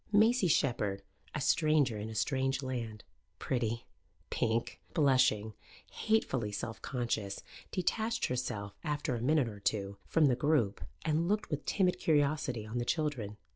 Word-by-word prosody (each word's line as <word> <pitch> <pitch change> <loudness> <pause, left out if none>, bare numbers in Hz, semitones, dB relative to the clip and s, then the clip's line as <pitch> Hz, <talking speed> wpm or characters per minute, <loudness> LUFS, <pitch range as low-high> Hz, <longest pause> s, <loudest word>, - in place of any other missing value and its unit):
Maisie 220 0 +5
Shepherd, 105 - +1 0.3
a - - 0
stranger 150 -4 +3
in 105 +2 -4
a 110 - -7
strange 135 +3 0
land, 115 -5 -4 0.3
pretty, 115 -2 -1 0.5
pink, 115 0 -1
blushing, 130 - +3 0.4
hatefully 130 - 0
self 110 +2 -5
conscious, 115 -6 -2 0.3
detached 220 +5 0
herself, 105 -5 -3
after 150 -5 -1
a 120 - -2
minute 145 0 +3
or 105 -2 -7
two, 100 -1 -1
from 160 -2 +4
the 130 -3 +4
group 135 -7 +1 0.2
and 160 +2 +1
looked 210 0 0
with 150 -1 -2
timid 185 -3 +2
curiosity 145 -6 +1
on 110 +3 -3
the - - 0
children. 125 -9 -1
130 Hz, 140 wpm, -32 LUFS, 110-155 Hz, 0.5 s, Maisie